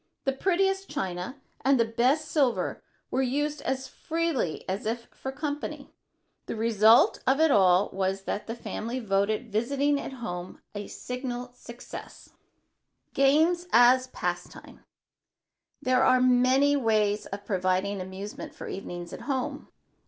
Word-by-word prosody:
The 270 - +1
prettiest 385 +5 +1
china 185 +8 -4 0.2
and 270 -1 +4
the 230 - +4
best 250 +7 +1
silver 270 -6 +1 0.3
were 260 - +1
used 290 +3 -1
as 265 0 -2
freely 325 - -2
as 195 +3 -3
if 235 +1 -3
for 265 - -6
company. 290 0 -5 0.5
The - - -3
result 220 0 +5
of 270 +3 +3
it 320 -1 +5
all 185 -2 +4
was 195 0 -1
that 205 - -4
the 230 - -4
family 235 +1 -4
voted 215 +1 0
visiting 280 +6 +1
at - - -6
home 180 -8 -6
a 205 -1 -5
signal 250 -1 -5
success. 240 -1 -10 0.8
[Sidenote: - - -45 0.4
GAMES 350 0 -7
AS 250 +2 +6
A - - -28
PASTIME] 180 -5 -5 1.0
There 255 0 +3
are 255 0 +5
many 255 +3 +4
specific 280 -4 0
ways 210 -1 +2
of 200 +1 -7
providing 190 0 0
amusement 190 +2 -7
for - - -8
evenings 175 -2 -6
at - - -7
home. 260 -2 -2
245 Hz, 145 wpm, -27 LUFS, 200-270 Hz, 1.0 s, AS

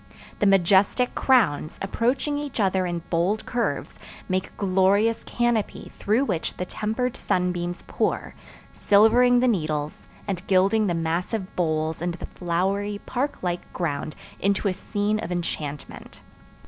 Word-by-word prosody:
The 205 - +3
majestic 195 +6 +3
crowns, 195 - +2
approaching 255 +8 0
each 290 -4 -5
other 190 -2 +2
in 170 -1 -3
bold 180 +6 +1
curves, 240 -1 -2 0.3
make 185 0 -1
a - - -22
glorious 200 +3 +2
canopy 240 -3 -1
through 225 +7 +1
which 165 -11 -2
the 180 - -2
tempered 225 +6 -2
sunbeams 175 -1 -1
pour, - - -1 0.4
silvering 240 +4 +5
the 255 - +3
needles, 155 -8 -2 0.2
and 190 -3 -2
gilding 200 +3 +3
the 175 - 0
massive 175 +5 -2
boles 155 -2 -1
and 175 0 -2
the - - -7
flowery, 195 +4 -1
park 260 -1 -2
like 175 -1 -3
ground 155 -2 -3 0.2
into 200 +1 +1
a 190 - +1
scene 205 +2 -1
of 180 -5 -5
enchantment. 155 -4 -5
195 Hz, 135 wpm, -25 LUFS, 175-220 Hz, 0.4 s, silvering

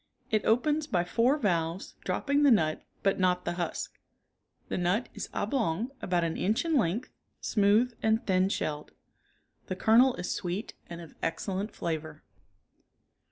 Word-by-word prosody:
It 215 -2 +2
opens 295 +7 +2
by 175 - +1
four 235 +10 +2
valves 170 - -1
dropping 285 0 0
the 290 - +6
nut 160 -10 +3 0.2
but 195 -1 +2
not 180 -1 +2
the - - 0
husk. 175 -2 -4 0.7
The - - -2
nut 180 +7 0
is - - -6
oblong, 220 0 -1
about 175 -2 +1
an 165 -1 -1
inch 215 - +1
in 325 -1 +1
length, 225 0 0 0.3
smooth 215 +4 +3
and 220 +1 +1
thin 185 0 +2
shelled. 150 -6 -3 0.7
The 185 - -3
kernel 240 +6 +5
is 180 - -4
sweet 180 +4 -4 0.2
and 170 0 -7
of 165 - -12
excellent 195 +5 -2
flavor. 155 -2 -4
195 Hz, 150 wpm, -29 LUFS, 175-235 Hz, 0.7 s, the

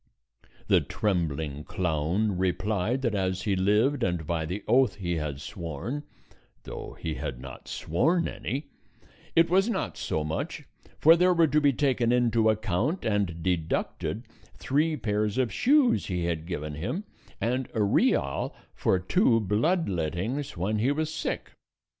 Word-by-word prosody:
The - - +4
trembling 80 -7 -2
clown 90 +5 0
replied 100 +6 0
that 115 -4 +1
as 95 -2 -1
he 100 -3 +1
lived 105 +9 +2
and 90 -6 0
by 80 -1 -1
the 95 +5 -4
oath 130 +1 +4
he 85 -3 -2
had 75 -3 -3
sworn 85 - -5 0.6
(though - - -8
he 80 - -3
had 60 - -5
not 65 +1 -10
sworn 160 - +1
any) 140 +2 -4 0.6
it 165 0 +6
was 190 +5 +3
not 205 -5 -2
so 80 - -1
much; 75 +1 -3 0.3
for 160 +2 +7
there 180 +1 +4
were 165 -1 +5
to 150 0 +2
be 145 -1 +5
taken 125 -3 +1
into 115 -2 +3
account 110 - 0
and 100 -6 0
deducted 90 +5 -1 0.3
three 155 +3 +1
pairs 105 -2 -1
of 130 -3 +1
shoes 275 -2 +3
he 90 -3 -1
had 85 -1 -2
given 75 -4 -4
him, 90 - -3 0.4
and 125 +2 -1
a 110 - +2
real 100 - +1 0.2
for 95 - +2
two 115 - +3
blood 115 - +1
lettings 95 - -2
when 105 +5 0
he 125 +6 +2
was 155 +2 -1
sick. - - -3
105 Hz, 150 wpm, -27 LUFS, 85-135 Hz, 0.6 s, for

